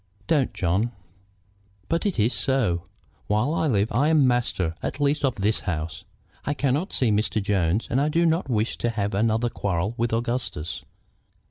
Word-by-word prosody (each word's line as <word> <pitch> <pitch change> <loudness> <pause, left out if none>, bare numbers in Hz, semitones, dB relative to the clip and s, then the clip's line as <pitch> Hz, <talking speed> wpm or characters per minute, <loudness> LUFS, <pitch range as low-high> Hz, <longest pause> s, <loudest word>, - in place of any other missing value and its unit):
"Don't, 150 -7 +2
John!" 100 +4 0 0.9
"But 170 +5 0
it 195 - -2
is 110 +3 +2
so. 110 -11 0 0.4
While 110 +9 +1
I 160 - +1
live 105 -5 +1
I 135 +7 +2
am 155 -3 +4
master 120 -9 +1
at - - -4
least 145 +1 +1
of 135 -3 +2
this 105 0 +1
house. 80 -2 -4 0.4
I 145 - -1
cannot 145 +7 0
see 125 -4 +2
Mr. 110 +1 +1
Jones, 100 0 +1
and 130 +4 +1
I 150 - +2
do 165 +2 +2
not 165 -2 +1
wish 110 -1 0
to 120 - 0
have 105 -3 -2
another 115 +3 +1
quarrel 95 +2 -1
with 120 0 0
Augustus. 115 - -2
115 Hz, 170 wpm, -25 LUFS, 100-140 Hz, 0.9 s, am